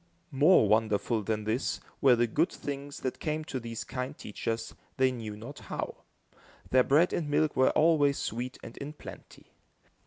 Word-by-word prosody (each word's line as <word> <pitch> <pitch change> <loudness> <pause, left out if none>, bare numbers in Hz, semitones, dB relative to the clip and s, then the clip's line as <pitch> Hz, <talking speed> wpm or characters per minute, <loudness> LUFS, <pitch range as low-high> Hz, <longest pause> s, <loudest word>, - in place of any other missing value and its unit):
More 145 - +5
wonderful 110 +1 +2
than 110 +1 -2
this, 110 +5 -1 0.2
were 130 -3 +6
the 120 0 +3
good 155 - +1
things 140 0 -6
that 130 - -3
came 155 0 -2
to 135 -5 -4
these 115 -1 -5
kind 130 +3 -5
teachers, 115 +2 -4 0.2
they 130 -1 +4
knew 110 -4 -6
not 120 +7 -9
how. - - -5 0.7
Their 130 0 +6
bread 155 +8 +3
and 155 -4 -1
milk 150 +1 +2
were 130 - +5
always 150 -3 +3
sweet 125 +3 -4
and 115 - -9
in 145 +2 -6
plenty. - - -12
130 Hz, 165 wpm, -29 LUFS, 115-145 Hz, 0.7 s, were